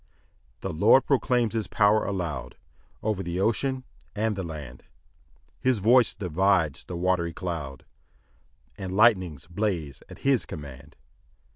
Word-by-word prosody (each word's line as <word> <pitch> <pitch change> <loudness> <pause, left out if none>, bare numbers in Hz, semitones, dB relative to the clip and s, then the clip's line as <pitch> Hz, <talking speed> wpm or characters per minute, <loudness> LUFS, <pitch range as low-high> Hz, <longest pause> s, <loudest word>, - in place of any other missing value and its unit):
2 - - -2
The - - -4
Lord 110 +10 +5
proclaims 125 -4 +1
his 110 -2 -2
power 105 0 +3
aloud 75 -11 -4 0.5
Over 105 -3 -1
the 85 0 -3
ocean 130 +6 0 0.3
and 110 0 0
the 95 - -3
land; 75 -8 -8 0.8
His 130 -2 +2
voice 115 +4 +4
divides 90 - +1
the 90 - -6
watery 85 -1 0
cloud, 80 -7 -5 0.9
And 95 0 -4
lightnings 95 - +3
blaze 85 - -3
at - - -13
his 135 -3 +3
command. 70 -2 -10
95 Hz, 130 wpm, -26 LUFS, 80-110 Hz, 0.9 s, Lord